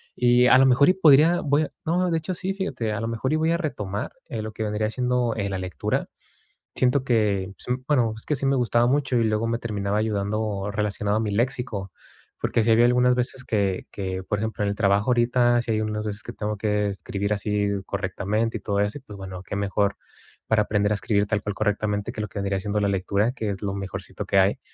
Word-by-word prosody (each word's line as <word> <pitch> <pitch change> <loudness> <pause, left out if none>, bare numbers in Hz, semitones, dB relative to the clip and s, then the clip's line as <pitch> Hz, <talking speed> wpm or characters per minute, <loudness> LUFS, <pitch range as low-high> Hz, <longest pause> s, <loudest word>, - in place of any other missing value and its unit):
y 125 0 +4
a 130 - +7
lo 135 - +6
mejor 140 +5 +5
podría 160 +3 +6
voy 145 +1 +2
a - - -5
no, 180 +2 +1
de 165 - +2
hecho, 165 +4 -3
sí, 190 +2 -2
fíjate, 190 - -3
a 105 - -3
lo 115 - -2
mejor, 115 +5 -1
y - - +3
voy 160 +1 +1
a 170 - +2
retomar, 105 - -4 0.2
eh, 110 - -4
lo 110 - -5
que 110 - -8
vendría 105 0 -1
siendo, 125 -1 0
eh, 100 -2 -2
la 95 - -2
lectura, 90 -5 -2 0.7
siento 130 +1 +2
que, 100 -6 +1
pues, 125 +1 -1
bueno, 120 -7 +2
es - - -8
que 150 - 0
sí 135 - -2
me 135 - +3
gustaba 120 -1 +2
mucho, 135 0 +1
y 115 - +3
luego 110 +1 0
me 115 0 0
terminaba 105 -2 -2
ayudando 105 -1 -1
relacionado 105 0 -1
a - - 0
mi 105 -2 -1
léxico, 120 -4 -2 0.5
porque - - +1
sí 115 - +3
había 115 +2 +6
algunas 125 +1 +4
veces 125 +1 -2
que 100 -4 -1
que, 95 -2 -4
por 105 +2 -2
ejemplo, 110 -1 -2
en 100 - +1
el 100 - -2
trabajo, 100 +3 +2
ahorita 120 0 +3
sí 120 - -3
hay 110 0 +1
unas 105 0 -2
veces 105 0 -4
que - - -7
tengo 105 0 -3
que 105 0 0
escribir 100 +1 -3
así 105 0 0 0.2
correctamente 100 +3 -2
y - - -12
todo 100 0 -1
eso 105 +6 -1
y, - - -23
pues, 105 -5 -11
bueno, 95 -2 -7
qué 100 - -6
mejor, 100 0 0 0.5
para 110 -1 +3
aprender 105 0 +1
a - - 0
escribir 100 -1 +1
tal 105 -1 0
cual 105 -1 -3
correctamente 105 0 -1
que 110 - -5
lo 105 - -3
que 100 - -11
vendría 100 -1 -1
siendo 105 +2 -1
la 100 - +1
lectura, 100 +4 +1
que 110 -4 -3
es 95 - -6
lo 100 -1 -2
mejorcito 100 -1 -6
que 100 - +1
hay, 95 +1 +3
110 Hz, 235 wpm, -24 LUFS, 100-125 Hz, 0.7 s, a